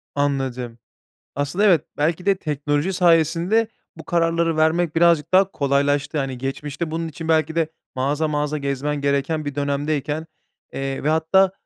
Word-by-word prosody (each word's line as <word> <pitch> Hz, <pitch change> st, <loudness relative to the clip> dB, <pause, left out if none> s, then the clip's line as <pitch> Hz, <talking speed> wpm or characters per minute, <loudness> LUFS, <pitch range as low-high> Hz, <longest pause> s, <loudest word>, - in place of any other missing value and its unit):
Anladım. 130 Hz, -4 st, -2 dB, 0.6 s
Aslında 145 Hz, +9 st, 0 dB
evet, 180 Hz, -8 st, +4 dB
belki 165 Hz, +5 st, 0 dB
de 200 Hz, -, +5 dB
teknoloji 150 Hz, +1 st, -1 dB
sayesinde 175 Hz, +5 st, +3 dB, 0.3 s
bu 160 Hz, -, -10 dB
kararları 165 Hz, -1 st, +1 dB
vermek 160 Hz, +1 st, +2 dB
birazcık 170 Hz, -2 st, +3 dB
daha 190 Hz, +1 st, +5 dB
kolaylaştı. 145 Hz, 0 st, 0 dB
Hani, 135 Hz, -2 st, -3 dB
geçmişte 145 Hz, +4 st, -4 dB
bunun 165 Hz, +1 st, -3 dB
için 160 Hz, +1 st, -7 dB
belki 160 Hz, -1 st, +2 dB
de 165 Hz, -2 st, +1 dB, 0.3 s
mağaza 145 Hz, +4 st, 0 dB
mağaza 150 Hz, 0 st, -1 dB
gezmen 140 Hz, +1 st, -2 dB
gereken 140 Hz, +2 st, 0 dB
bir 145 Hz, -1 st, -4 dB
dönemdeyken, 145 Hz, +2 st, -2 dB, 0.5 s
eee, 135 Hz, 0 st, -4 dB
ve -, -, +2 dB
hatta, 160 Hz, +5 st, +3 dB
150 Hz, 145 wpm, -22 LUFS, 140-165 Hz, 0.6 s, de